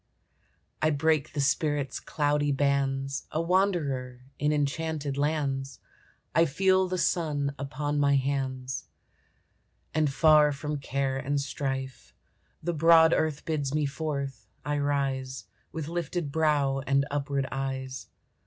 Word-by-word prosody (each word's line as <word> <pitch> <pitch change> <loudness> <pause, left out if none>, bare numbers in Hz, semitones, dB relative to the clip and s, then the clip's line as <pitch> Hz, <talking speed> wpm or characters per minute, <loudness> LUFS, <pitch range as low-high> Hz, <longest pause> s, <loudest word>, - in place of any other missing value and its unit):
I 155 - +4
break 155 0 +1
the 145 - -3
spirit's 145 0 0
cloudy 145 -1 0
bands, 140 0 0
A 155 - -2
wanderer 165 -9 0 0.2
in 150 0 +2
enchanted 150 0 -1
lands, 140 -4 -1 0.5
I 165 - +5
feel 190 +5 +3
the 185 0 -2
sun 150 -6 0
upon 145 +1 -2
my 140 -1 +4
hands; 130 -1 -2 1.1
And 155 -2 +2
far 150 +1 +5
from 150 +1 -3
care 135 -1 -1
and 140 +2 -1
strife 135 -1 -4 0.5
The 175 +2 -1
broad 165 +1 +6
earth 155 -2 0
bids 145 -3 -1
me 150 -1 +2
forth. 140 -1 -4 0.2
I 145 0 0
rise 135 -2 -1 0.3
With 160 -3 -5
lifted 170 -2 -3
brow 145 -3 +2
and 140 0 +3
upward 140 -1 -1
eyes. 130 -2 -4
145 Hz, 125 wpm, -28 LUFS, 135-155 Hz, 1.1 s, broad